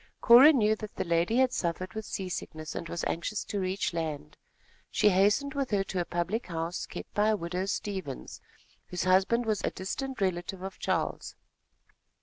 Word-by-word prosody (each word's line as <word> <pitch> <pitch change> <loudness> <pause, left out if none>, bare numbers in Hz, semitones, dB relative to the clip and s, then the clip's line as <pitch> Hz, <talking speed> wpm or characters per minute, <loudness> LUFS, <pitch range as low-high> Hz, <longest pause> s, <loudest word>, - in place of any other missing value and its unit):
Cora 255 +6 +9
knew 220 -7 +3
that 215 -1 -8
the - - -1
lady 170 +6 +1
had 260 -1 +3
suffered 185 +2 -2
with 220 -1 -5
seasickness, 165 -4 -5
and 170 - -5
was 170 - -4
anxious 185 +5 -2
to 205 - -3
reach 185 -1 -1
land. 155 - -4 0.5
She 210 - +4
hastened 205 +9 +3
with 275 -2 -1
her 200 -2 +1
to 190 -2 -2
a - - -3
public 175 +8 -2
house 165 0 -3
kept - - -8
by 210 +1 +2
a 215 - +2
widow 180 +2 -3
Stevens, 190 -8 -4 0.5
whose 180 - -3
husband 190 +6 +3
was 215 -2 -1
a - - +1
distant 265 +8 -5
relative 185 0 -2
of 190 - -7
Charles. - - -2
190 Hz, 175 wpm, -29 LUFS, 175-215 Hz, 0.5 s, Cora